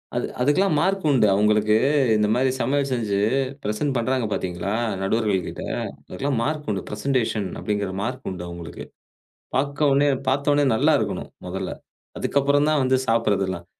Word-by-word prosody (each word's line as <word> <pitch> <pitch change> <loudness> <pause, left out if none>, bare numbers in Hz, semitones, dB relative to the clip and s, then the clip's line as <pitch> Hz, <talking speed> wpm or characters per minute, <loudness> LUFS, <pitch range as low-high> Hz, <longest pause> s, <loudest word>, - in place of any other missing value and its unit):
அது - - -1
அதுக்கெல்லாம் 155 +5 +3
மார்க் 195 +1 0
உண்டு. 130 -6 +4
அவுங்களுக்கு 105 +1 +3 0.4
இந்த 105 0 +2
மாரி 130 +1 +2
சமையல் 140 +3 0
செஞ்சு 110 -5 0 0.5
பிரசென்ட் 105 +7 -1
பண்றாங்க 125 +1 0
பாத்தீங்களா, 95 +1 -2 0.3
நடுவர்கள் 100 -1 +1
கிட்ட? - - -6 0.5
அதுக்கெல்லாம் 135 -3 -1
மார்க் 150 +2 -2
உண்டு. 95 - -2
பிரசென்டேஷன் 110 -2 -1
அப்டிங்கிற 105 -2 -2
மார்க் 125 +4 -4
உண்டு 90 -2 -6
அவுங்களுக்கு. 85 -1 -8 0.7
பாக்க 140 +2 -1
ஒன்னே 140 +1 +4 0.2
பாத்தவுன்னே 145 +2 +2
நல்லா - - +3
இருக்கணும், - - -3 0.2
மொதல்ல. - - -4 0.5
அதுக்கப்பறம்தான் 145 +2 +2
வந்து 130 0 +3
சாப்பிறதெல்லாம். 95 -6 0
120 Hz, 135 wpm, -23 LUFS, 105-140 Hz, 0.7 s, உண்டு